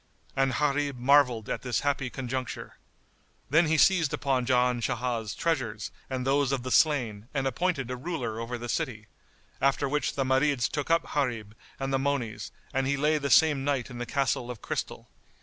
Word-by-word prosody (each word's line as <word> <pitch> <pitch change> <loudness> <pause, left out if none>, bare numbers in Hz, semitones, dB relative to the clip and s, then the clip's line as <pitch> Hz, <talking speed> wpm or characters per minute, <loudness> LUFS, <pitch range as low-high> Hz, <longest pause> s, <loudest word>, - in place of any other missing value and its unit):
And 135 -1 +2
Gharib 145 -1 0
marvelled 125 -4 +4
at - - -3
this 125 -3 -1
happy 140 -2 0
conjuncture. 130 0 -5 0.7
Then 160 +3 +5
he 160 +1 +2
seized 165 -2 +4
upon 130 -3 0
Jan 125 -1 +2
Shah's 120 -3 -2
treasures 120 -10 -2 0.2
and 130 -1 -3
those 140 0 +2
of 135 -3 -1
the 130 - -4
slain 120 -9 +2
and 135 -1 0
appointed 135 -2 -1
a - - -2
ruler 125 -6 -4
over 120 +1 -4
the 120 +1 -6
city; 120 -5 -2 0.6
after 140 +1 +2
which 150 +2 -1
the 135 - +1
Marids 130 -1 +2
took 145 -1 -4
up 165 0 +2
Gharib 115 -7 -1 0.3
and 135 0 -2
the 135 - +2
monies 120 -7 -2 0.2
and 135 0 0
he 140 +1 +1
lay 150 +2 +2
the 140 -1 -2
same 140 +3 +5
night 135 -3 -1
in 120 - -7
the 120 - -4
Castle 130 -1 0
of 120 -3 -6
Crystal. - - -4
135 Hz, 185 wpm, -28 LUFS, 120-145 Hz, 0.7 s, Then